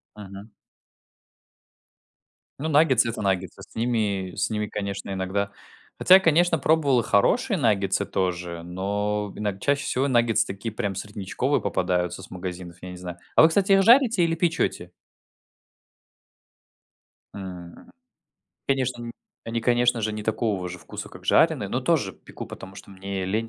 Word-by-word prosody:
Мгм. 100 +1 -11 2.1
Ну 155 - -2
наггетсы- 140 -6 +4
это 110 - -5
наггетсы 95 -3 -2
с - - -17
ними 105 -6 -1
с - - -1
ними, 105 -1 -2
конечно, 100 -1 -5
иногда 95 +1 -2 0.5
хотя 185 +1 +7
конечно 170 -2 +3
пробовал 140 -4 +3
и - - 0
хорошие 195 - +2
наггетсы 100 - +1
тоже, 90 -3 -2
но 100 +3 -2
иног 105 -2 -3
чаще 145 +3 0
всего 135 0 0
наггетсы 120 -4 +2
такие 100 +3 -6
прям 100 -2 -3
среднячковые 105 +7 -2
попадаются 90 0 -1
с 95 - -12
магазинов, 90 -1 -7
я 90 0 -8
не 90 - -9
знаю. 90 -1 -7 0.2
А - - +7
вы 160 - +7
кстати 195 +4 +1
их 195 0 +6
жарите, 230 -4 +5
или 165 0 +1
печете? 165 0 -1 2.4
М, 90 -3 -9 0.8
конечно 130 -3 0
ни 115 - -6 0.4
они 115 0 -2
конечно 120 0 +2
же 110 0 -1
не 105 0 -5
такого 105 -4 -1
же 90 - -8
вкуса - - -8
как - - -13
жареные, - - +3
но - - -1
тоже - - +1
пеку - - -10
потому 95 0 -10
что 100 0 -12
мне 95 0 -5
лень 110 +4 -1
105 Hz, 150 wpm, -25 LUFS, 95-130 Hz, 2.4 s, хотя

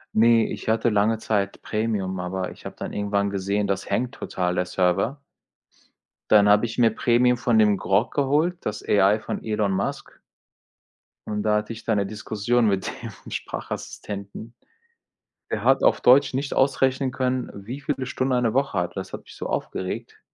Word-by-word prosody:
Ne, 115 0 +5
ich - - -5
hatte 115 +1 +2
lange 105 +1 +2
Zeit 100 -3 -1
Premium, 105 -4 -2
aber 90 +1 -3
ich - - -15
habe - - -7
dann - - -6
irgendwann 100 -1 0
gesehen, 100 +1 -1
das 100 -1 -2
hängt 125 0 0
total, 90 -8 -2
der 90 - -1
Server. 95 +11 0 1.1
Dann 105 -1 +6
habe 105 +2 +5
ich 115 - -6
mir 115 -2 +4
Premium 125 +1 +3
von 120 -2 +2
dem 105 -1 +5
Grok 95 +5 +1
geholt, 150 +6 +1
das 105 0 -3
AI 100 +2 +4
von - - -5
Elon 105 -3 0
Musk 95 +1 -4 1.1
und 105 -1 -2
da 105 -1 +2
hatte 105 +2 -3
ich 110 0 -11
dann 110 -2 +1
'ne 100 - +1
Diskussion 110 +2 0
mit 100 +1 0 0.4
dem - - -11
Sprachassistenten. 100 +3 -6 1.0
Der - - -2
hat - - +4
auf - - +4
Deutsch 135 +2 +5
nicht 135 +2 -2
ausrechnen 135 0 +2
können, 130 -1 -1
wie 115 +8 -7
viele 140 -2 -2
Stunden 130 0 -1
eine 125 -3 +1
Woche 135 +1 0
hat. 90 +1 -3
Das 95 - -6
hat - - -6
mich - - -14
so - - -5
aufgeregt. 95 - -4
110 Hz, 175 wpm, -24 LUFS, 100-125 Hz, 1.1 s, Dann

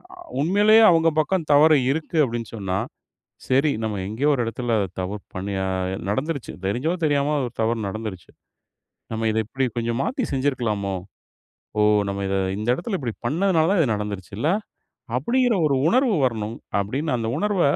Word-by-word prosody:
அ - - -19 0.2
உண்மயிலேயே 205 +7 +5
அவங்க 165 0 +4
பக்கம் 160 +1 0
தவறு 155 +1 +6
இருக்கு 160 +2 -3
அப்டின்னு 115 -3 -3
சொன்னா. 95 -3 -2 0.7
"சரி 135 +4 +3
நம்ம 110 -2 -2
எங்கேயோ 120 +8 0
ஒரு 125 - 0
இடத்துல 115 +1 -2 0.3
தவறு 100 +2 -4
பண்ணி 100 +2 -3
அ - - -1 0.4
நடந்துருச்சு. 140 +5 -2
தெரிஞ்சோ 125 - 0
தெரியாமோ 145 0 +2
ஒரு 120 - -5
தவறு 115 0 0
நடந்துருச்சு. 100 -3 -6 0.8
நம்ம 110 0 -1
இத 110 - -2
இப்டி 130 +4 -1
கொஞ்சம் 115 +1 -1
மாத்தி 260 0 -1
செஞ்சுருக்கலாமோ? 115 -8 -1 0.8
ஓ! - - +4 0.3
நம்ம 100 0 -3
இத 95 - 0 0.2
இந்த 105 +2 -4
இடத்துல 190 - -3
இப்டி 120 -5 -3
பண்ணதனால 165 +2 +2
தான் 200 -4 +3
இது 125 -8 +2
நடந்துருச்சு 100 -2 -5
இல்ல?" 150 - +1 0.7
அப்டிங்கிற 245 - +2
ஒரு 140 - +1
உணர்வு 250 0 +3
வரணும். 110 -2 -2 0.2
அப்டின்னு 130 +8 -2
அந்த 115 -1 -2
உணர்வ 205 -1 +1
130 Hz, 155 wpm, -23 LUFS, 110-160 Hz, 0.8 s, தவறு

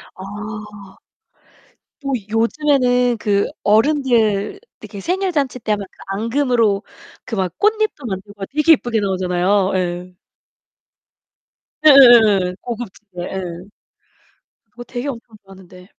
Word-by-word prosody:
아. - - -11 1.8
뭐 275 - -2 0.2
요즘에는 245 0 +2
그 200 -1 +1 0.2
어른들 225 - +2 0.2
이렇게 205 -1 -10
생일잔치 335 - -1
때 215 -1 -1
막 205 - -7
그 - - -31
앙금으로 230 0 +1 0.4
그 225 - -5
막 185 -2 -2
꽃잎도 425 - 0
만들고 195 +1 -7
되게 300 +3 +2
이쁘게 240 -6 0
나오잖아요. 185 0 +1
예. 180 0 -3 1.7
예예예예. 225 -10 +7
고급지게 215 -6 -8
예. 190 +1 -4 1.3
그거 240 - -8
되게 245 +3 -6
엄청 230 -4 -8
좋았는데. 185 -1 -15
220 Hz, 235 characters per minute, -19 LUFS, 195-260 Hz, 1.8 s, 예예예예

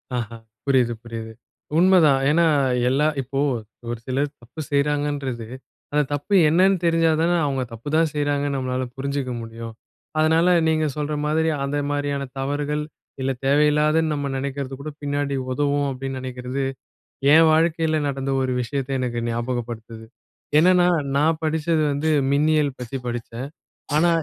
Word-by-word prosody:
ஆஹா. 115 -2 -3 0.3
புரியுது, 130 -4 +3
புரியுது. 115 -1 -7 0.4
உண்மைதான். 170 -6 +5
ஏன்னா, 170 +3 +4 0.4
எல்லா 140 +4 +2
இப்போ 135 +1 -4 0.5
ஒரு 120 - -2
சிலர் 135 +3 0
தப்பு 120 +7 -13
செய்யறாங்கன்றது, 140 -4 -1 0.4
அந்தத் 145 -1 +1
தப்பு 145 +8 0
என்னன்னு 185 +4 +4
தெரிஞ்சாதானே 165 0 +3
அவங்க 135 -2 -1
தப்புதான் 155 +8 0
செய்யறாங்கன்னு 145 -1 0
நம்மளால 130 0 -2
புரிஞ்சுக்க 140 -1 -2
முடியும். 115 0 -8 0.5
அதனால 160 +2 +4 0.2
நீங்க 155 -1 +2
சொல்ற 150 0 -2
மாதிரி, 160 +2 +1
அந்த 140 +1 -1
மாதிரியான 145 -1 -1 0.2
தவறுகள், 145 +2 -1 0.4
இல்ல 135 +1 0
தேவையில்லாதன்னு 150 +3 +3
நம்ம 145 -1 -2
நினைக்கறது 135 0 -4
கூட, 155 - -5
பின்னாடி 145 -1 -1 0.2
உதவும் 145 +1 +1
அப்படின்னு 135 0 -5
நினைக்கிறது, 130 +1 -4 0.7
என் 160 0 +7
வாழ்க்கையில 160 -1 +2
நடந்த 135 -1 -3
ஒரு 130 -1 -1
விஷயத்தை 135 +2 -3
எனக்கு 120 -2 -2
ஞாபகப்படுத்துது. 115 -1 -4 0.5
என்னன்னா 180 +2 +5 0.3
நான் 155 +2 +2
படிச்சது 160 0 +1
வந்து 145 +3 0 0.2
மின்னியல் 150 -1 +2
பத்தி 125 +1 -5
படிச்சேன். 120 +2 -5 0.5
ஆனா 165 +3 +4
145 Hz, 130 wpm, -23 LUFS, 130-155 Hz, 0.7 s, என்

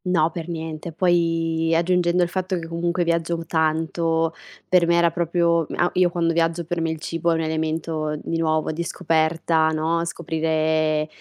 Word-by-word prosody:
No, 170 -3 +2
per 170 0 -6
niente. 160 0 -5
Poi 165 -2 +1
aggiungendo 175 +1 +2
il 175 - -1
fatto 185 +1 -2
che 165 - -5
comunque 170 +1 -1
viaggio 170 0 0
tanto, 160 0 0 0.3
per 180 -2 +4
me 170 - +3
era 170 -1 +3
proprio, 170 -1 +1
mhmm, - - -6
a 175 - +3
io 180 -1 +3
quando 170 -1 0
viaggio 165 +1 0
per 175 0 -2
me 165 - 0
il 160 -1 -4
cibo 165 +2 -2
è 165 - +3
un 165 - -1
elemento, 160 -1 -2
di 165 +1 -3
nuovo, 155 -1 0
di 165 +2 -3
scoperta, 160 0 +1
no: 160 +2 0
scoprire 155 -2 0
165 Hz, 175 wpm, -22 LUFS, 160-170 Hz, 0.3 s, per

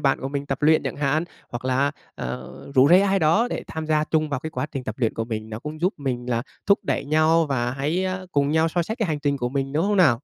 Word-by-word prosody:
bạn 135 -2 +2
của 135 - -3
mình 140 0 -4
tập 135 +1 -3
luyện 155 +1 +5
chẳng - - -4
hạn, 150 +3 +1 0.2
hoặc 120 +1 -6
là, 130 +2 +2 0.2
ờ, 65 +1 -5 0.2
rủ 130 +2 +6
rê 180 +2 +7
ai 195 0 +2
đó 180 +9 +3
để - - -3
tham 160 -1 -5
gia 155 -1 +2
chung 155 -1 0
vào 135 -3 -2
cái 160 - -5
quá 130 -2 -3
trình 135 -3 -4
tập 110 - -4
luyện 115 -4 +1
của 115 - -2
mình, 110 -1 -5
nó 110 - -5
cũng 155 +4 -7
giúp 185 +3 +1
mình 125 -3 -3
là 115 0 +1 0.2
thúc 200 0 +5
đẩy 140 -2 -1
nhau 155 +2 +3
và 125 -3 0
hãy, 150 +8 -1
a, 185 0 -2
cùng 140 0 +2
nhau 160 +1 +3
soi 170 +1 0
sách 220 +6 -4
cái 220 -7 0
hành 150 -2 -1
trình 140 -1 +1
của 120 -2 -2
mình, 135 +1 -2
đúng 155 +3 +1
không 205 0 +1
nào? 140 -11 +5
145 Hz, 285 wpm, -24 LUFS, 130-160 Hz, 0.2 s, rê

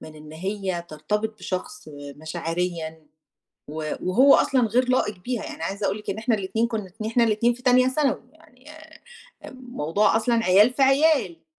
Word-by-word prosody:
من 155 - -11
إن 155 0 -13
هي 190 0 -4
ترتبط 210 +8 -3
بشخص 185 -3 -6
آآ 145 -1 -10
مشاعريًا، 160 0 -4 0.6
و 155 0 -4
وهو 255 +10 +5
أصلًا 265 -2 +2
غير 250 +3 +1
لائق 210 -6 +1
بيها، 240 +4 -4
يعني - - -7
عايزة 200 +4 -3
أقول 195 - -1
لِك 210 - -9
إن 200 - -3
إحنا 225 0 +1
الاتنين 220 +4 -1
كنُا 215 -5 -5
إن 215 - -2
إحنا 235 +2 +2
الاتنين 230 +2 +2
في 250 - -14
تانية 255 0 +4
ثانوي، 270 0 0
يعني 305 -4 -20
آآ 315 0 -15 0.5
آآ - - -9
موضوع 225 - -1
أصلًا 230 0 +1
عيال 205 +7 +5
في 275 - -3
عيال. 300 +4 +2
215 Hz, 180 wpm, -24 LUFS, 175-250 Hz, 0.6 s, وهو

